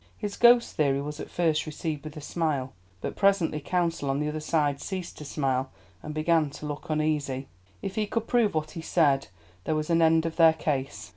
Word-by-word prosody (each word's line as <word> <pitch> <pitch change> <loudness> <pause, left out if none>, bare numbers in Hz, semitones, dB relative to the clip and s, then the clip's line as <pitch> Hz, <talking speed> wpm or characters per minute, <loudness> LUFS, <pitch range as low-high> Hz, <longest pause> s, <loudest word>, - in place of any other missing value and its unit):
His 205 -2 -4
ghost 240 0 +5
theory 140 -3 +2
was 150 +2 -5
at - - -6
first 160 -3 +1
received 155 -1 -4
with 155 0 -8
a - - -6
smile, 145 -4 -2 0.3
but - - -4
presently 195 -6 +2
counsel 165 -2 -1
on 135 +1 0
the 150 0 -1
other 155 +1 -3
side 150 -3 0
ceased 185 -3 -5
to 150 - -8
smile, 135 -2 -1 0.3
and 150 - -6
began 155 0 +2
to 150 +2 -9
look 150 +1 -6
uneasy. 150 -4 -1 0.4
If 190 - -3
he 215 0 -1
could 230 +1 -2
prove 230 -7 +2
what 155 0 -1
he 165 - -6
said, 145 -5 +2 0.4
there 155 - 0
was 155 +2 -2
an 165 0 +4
end 160 0 +4
of 165 -1 -3
their 165 -2 +7
case. 140 -3 -3
155 Hz, 210 wpm, -27 LUFS, 145-170 Hz, 0.4 s, their